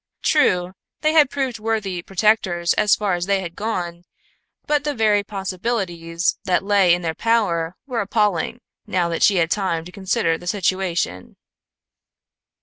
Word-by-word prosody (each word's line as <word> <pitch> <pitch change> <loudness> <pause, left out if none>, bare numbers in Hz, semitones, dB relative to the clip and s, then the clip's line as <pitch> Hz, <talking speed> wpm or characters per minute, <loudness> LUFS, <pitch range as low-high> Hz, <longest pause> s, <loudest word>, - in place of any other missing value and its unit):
True, 180 - +2 0.3
they 310 0 +2
had 300 -4 +5
proved 265 -5 -2
worthy 215 -5 -2
protectors 185 -3 +1
as 210 -2 +3
far 205 -2 -1
as 175 +1 -2
they 200 -1 +2
had 175 -2 -7
gone, 175 -5 -4 0.6
but 295 -1 +1
the 295 -1 -2
very 210 -3 +3
possibilities 185 -4 -2
that 185 0 +1
lay 195 -3 +4
in 175 - -6
their 165 -1 -1
power 180 -6 0
were 250 -4 -2
appalling, 210 +2 0 0.3
now 180 -4 0
that 165 - -3
she 205 - +5
had 165 -2 +1
time 170 -5 -1
to 180 - -10
consider 190 -3 0
the 175 - -11
situation. 185 - -1
190 Hz, 150 wpm, -21 LUFS, 175-220 Hz, 0.6 s, had